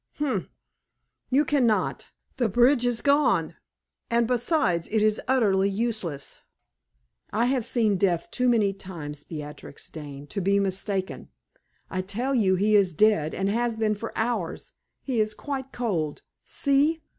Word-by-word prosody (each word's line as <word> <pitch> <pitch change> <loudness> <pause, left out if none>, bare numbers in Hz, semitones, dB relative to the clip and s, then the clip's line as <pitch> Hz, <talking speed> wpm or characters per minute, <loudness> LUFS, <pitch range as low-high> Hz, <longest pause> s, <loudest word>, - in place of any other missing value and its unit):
"Humph! 290 -3 -2 0.8
You 280 +3 +3
can 280 -5 +2
not. 215 - 0 0.3
The 240 -4 +1
bridge 245 +4 +4
is 240 -2 0
gone; 280 - +2 0.5
and, 235 0 +3
besides 235 - +1
it 220 -1 +1
is 215 0 +2
utterly 200 -7 +3
useless. 200 -9 -3 0.9
I 230 +3 +1
have 255 -1 +1
seen 215 -4 +1
death 180 -3 0
too 250 0 +1
many 215 -5 +3
times, 160 -7 -8
Beatrix 150 -2 -8
Dane, 145 -3 -8
to 200 +6 -4
be 200 +2 +2
mistaken. 195 0 -2 0.6
I 185 - -1
tell 225 +9 -2
you 200 -7 +3
he 210 +3 +3
is 190 -5 +3
dead 165 -6 +3
and 195 +1 -1
has 235 0 0
been 220 -1 +1
for 220 +2 -6
hours; 220 -7 -2 0.3
he 255 -4 -1
is 215 0 -1
quite 270 0 -5
cold. 175 - -2 0.2
See!" 295 +3 +1
215 Hz, 145 wpm, -26 LUFS, 185-245 Hz, 0.9 s, bridge